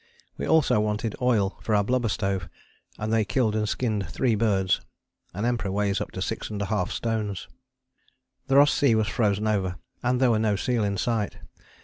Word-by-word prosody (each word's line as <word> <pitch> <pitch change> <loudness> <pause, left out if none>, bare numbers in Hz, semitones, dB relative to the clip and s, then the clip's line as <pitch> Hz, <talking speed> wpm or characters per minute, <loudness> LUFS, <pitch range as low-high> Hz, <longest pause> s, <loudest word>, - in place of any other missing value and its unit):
We - - -4
also 155 -9 +4
wanted 105 +1 -1
oil 110 -6 +1
for 110 - 0
our 100 - +3
blubber 125 +1 0
stove, 95 -4 -2 0.5
and 110 +1 -2
they 110 -1 +3
killed 110 0 0
and 105 -1 0
skinned 105 -7 -1
three 120 +6 +1
birds 100 -4 +1 0.5
an 100 +5 -3
Emperor 120 -5 -1
weighs 100 0 0
up - - -3
to - - -5
6½ 100 -2 -2
stones. 110 -6 -3 1.0
The 135 - +2
Ross 145 +1 +6
Sea 135 -6 +3
was 110 -1 +1
frozen 105 -2 +1
over, 95 -4 0 0.3
and 125 0 +1
there 130 -2 +4
were 110 - +2
no 110 -2 +2
seal 120 +2 0
in 100 -1 -1
sight. 110 -1 -1
110 Hz, 180 wpm, -26 LUFS, 100-120 Hz, 1.0 s, Ross